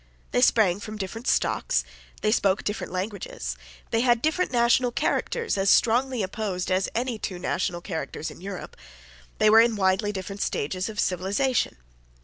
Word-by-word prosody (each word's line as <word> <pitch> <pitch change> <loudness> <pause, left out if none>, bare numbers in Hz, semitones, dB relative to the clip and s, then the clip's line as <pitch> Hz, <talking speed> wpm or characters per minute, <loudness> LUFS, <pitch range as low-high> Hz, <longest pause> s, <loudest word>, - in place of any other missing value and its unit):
They 245 - +2
sprang 205 -7 +4
from 215 +1 -7
different 215 +5 -6
stocks. - - +1 0.4
They 215 - +3
spoke 195 -3 +2
different 205 -3 -3
languages. 185 - -4 0.4
They 225 - +2
had 240 -1 +4
different 315 +5 0
national 240 0 +3
characters 460 - -1
as 195 0 +2
strongly 245 +1 +3
opposed 190 -2 -3
as 185 +1 +1
any 240 -1 -1
two 185 -4 -4
national 175 -1 -2
characters 160 -3 -5
in - - -13
Europe. 195 -1 -7 0.6
They 215 - +5
were 225 +1 +9
in 230 -1 +2
widely 195 +1 +1
different 195 0 -6
stages 185 +8 -2
of 210 -1 -7
civilisation. 200 - 0
210 Hz, 155 wpm, -26 LUFS, 185-235 Hz, 0.6 s, were